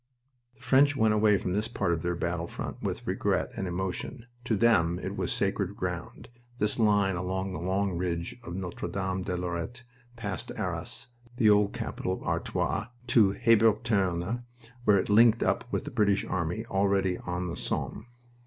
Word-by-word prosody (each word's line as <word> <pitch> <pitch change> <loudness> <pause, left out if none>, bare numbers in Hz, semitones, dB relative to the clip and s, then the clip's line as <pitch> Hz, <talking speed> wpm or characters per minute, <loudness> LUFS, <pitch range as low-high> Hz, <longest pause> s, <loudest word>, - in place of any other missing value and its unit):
The - - -25
French 135 +3 +4
went 110 -5 +3
away 105 -1 +4
from 90 - -3
this 105 +3 +1
part 95 -6 0
of 80 - -2
their 85 0 -1
battlefront 85 0 -4
with - - -3
regret - - 0
and 95 - -3
emotion. 95 +7 -4 0.2
To 110 - +1
them 90 -7 +3
it - - -5
was - - -1
sacred - - 0
ground, - - -5 0.3
this 105 0 0
line 105 -3 +3
from 95 +2 -2
the 75 - -4
long 95 +1 0
ridge 85 -1 -2
of 85 - -6
Notre 95 -2 -4
Dame 95 -1 -2
de 90 -1 -2
Lorette, 90 +7 -4 0.3
past 100 -5 -4
Arras, - - -4 0.3
the 110 -4 +5
old 105 -1 +3
capital 90 - -3
of - - -6
Artois, 105 +3 -1 0.2
to 105 -5 +5
Hebuterne, 110 -2 +2 0.4
where 100 - +6
it 95 - 0
linked 115 +2 +6
up 120 - 0
with - - -1
the 150 - -5
British 100 -5 +2
army 90 +5 -2
already 95 -3 +1
on 90 0 -3
the 85 - -4
Somme. 115 - -1
95 Hz, 170 wpm, -29 LUFS, 90-110 Hz, 0.4 s, where